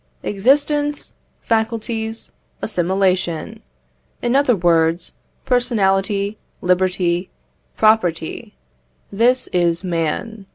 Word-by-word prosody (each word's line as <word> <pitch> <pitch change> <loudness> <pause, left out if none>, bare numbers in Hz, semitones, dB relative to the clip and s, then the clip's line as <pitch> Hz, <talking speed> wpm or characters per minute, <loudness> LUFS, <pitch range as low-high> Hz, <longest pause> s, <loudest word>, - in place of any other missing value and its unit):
Existence, 290 +7 +1 0.3
faculties, 225 0 -2 0.3
assimilation 185 -3 -1 0.6
in 240 +1 +1
other 275 -4 +4
words, 170 -1 +1 0.3
personality, 205 -4 +1 0.2
liberty, 180 -1 +1 0.5
property 180 - +1 0.6
this 240 +5 +2
is 175 -1 +1
man. 185 +5 -3
195 Hz, 70 wpm, -19 LUFS, 175-230 Hz, 0.6 s, other